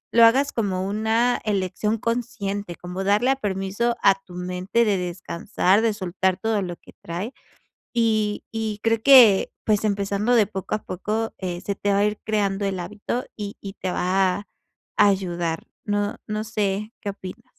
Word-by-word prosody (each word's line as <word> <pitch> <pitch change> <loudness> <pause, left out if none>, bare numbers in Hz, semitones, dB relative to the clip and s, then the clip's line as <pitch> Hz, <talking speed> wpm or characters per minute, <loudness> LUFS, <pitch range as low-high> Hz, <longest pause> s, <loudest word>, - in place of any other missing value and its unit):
lo 235 - +8
hagas 270 +5 +4
como 190 -4 -1
una 220 +4 +1
elección 210 +1 0
consciente, 215 -5 -3
como 180 +2 -5
darle 210 +6 +3
a 270 - +2
permiso 205 +1 -1
a 195 - +7
tu 180 - -13
mente 180 +6 0
de 200 -2 +2
descansar, 180 +3 0
de 225 -1 +2
soltar 185 -1 -1
todo 220 0 0
lo 175 -2 -4
que - - -17
trae 180 +9 -5 0.6
y 215 -3 +1
y 220 -2 -3
creo 225 -1 +2
que 245 -8 +7
pues 215 -1 +2
empezando 200 +3 0
de 220 -4 +5
poco 195 0 -5
a 215 - -5
poco, 215 +5 -3
eh, 180 -2 -4
se 200 - -3
te 200 +1 -1
va 200 - +3
a 205 - +4
ir 210 0 0
creando 205 -2 0
el 195 -2 -2
hábito 210 +7 -3
y 205 -1 -6
y 195 -1 -7
te 185 -2 -4
va 185 +1 +1
a 205 - -12 0.5
ayudar, 175 -4 +1 0.2
¿no 205 0 0
no 215 0 -3
sé 210 -1 -2
qué 200 - -3
opinas? 195 +3 -9
205 Hz, 175 wpm, -24 LUFS, 190-220 Hz, 0.6 s, lo